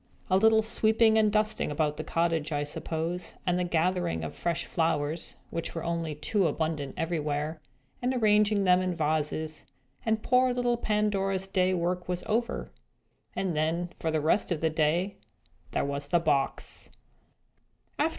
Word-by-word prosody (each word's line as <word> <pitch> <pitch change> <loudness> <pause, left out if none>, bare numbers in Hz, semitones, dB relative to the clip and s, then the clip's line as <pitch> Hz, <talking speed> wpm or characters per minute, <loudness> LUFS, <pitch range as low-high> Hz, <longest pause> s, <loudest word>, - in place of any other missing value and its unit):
A 185 - +6
little 220 +2 +5
sweeping 220 0 +4
and 215 -1 +3
dusting 215 +1 +1
about 150 0 0
the - - -3
cottage, 165 -2 0
I 145 -1 0
suppose, 165 +4 -3
and 180 0 +1
the - - +1
gathering 175 - 0
of 80 - -5
fresh 170 -1 -2
flowers 160 -1 -1 0.2
(which 165 - -3
were 165 - -3
only 165 -2 -2
too 185 +5 +1
abundant 150 -3 -2
everywhere), 155 -1 -2 0.4
and 250 +1 +1
arranging 210 -4 +3
them 180 -1 +5
in 185 -1 -1
vases 155 0 -1 0.4
and 220 -1 0
poor 250 0 +3
little 245 -1 +1
Pandora's 200 -4 0
day's 185 -1 +2
work 180 +1 -1
was 180 0 -1
over. 235 +2 -1 0.6
And 185 -4 -1
then, 165 +3 0
for 165 - -1
the 155 -1 0
rest 160 +6 +2
of 165 - 0
the 160 0 +1
day, 165 +5 +1 0.5
there - - -1
was 140 0 -3
the 175 - +3
box! 145 -4 -1
175 Hz, 155 wpm, -28 LUFS, 155-205 Hz, 0.6 s, A